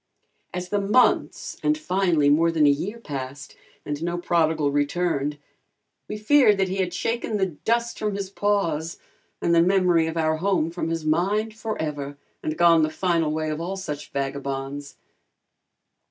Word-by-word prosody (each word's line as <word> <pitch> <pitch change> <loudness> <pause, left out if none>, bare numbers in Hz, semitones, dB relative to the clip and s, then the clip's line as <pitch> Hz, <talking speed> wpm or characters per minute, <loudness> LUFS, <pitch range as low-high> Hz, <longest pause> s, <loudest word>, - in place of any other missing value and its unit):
As 180 0 -5
the 205 +1 0
months 210 +6 +2
and 305 0 +2
finally 185 - +1
more 165 +4 +4
than 160 -2 +3
a 145 - +6
year 185 +11 -3
passed 140 - -7 0.3
and 145 0 -4
no 175 +1 -2
prodigal 160 -4 +1
returned, 145 0 0 0.7
we - - -4
feared 215 -1 +5
that 190 -1 +1
he 190 - -3
had 185 -2 0
shaken 225 +4 -2
the 195 - +2
dust 230 +7 -1
from 210 -2 -1
his 195 -1 -4
paws 170 -6 0 0.5
and 170 - +2
the 165 - +6
memory 180 -2 +3
of 160 +1 -4
our 155 -1 +1
home 175 -2 +1
from 170 -1 -3
his 165 -1 -3
mind, 200 +8 +1
forever, 150 -10 -4 0.2
and 155 0 -3
gone 170 -1 +6
the 155 - +2
final 165 -1 0
way 155 0 -2
of 155 +1 -4
all 185 +3 -3
such 150 -6 -6
vagabonds. 140 0 -4
170 Hz, 165 wpm, -24 LUFS, 150-195 Hz, 0.7 s, a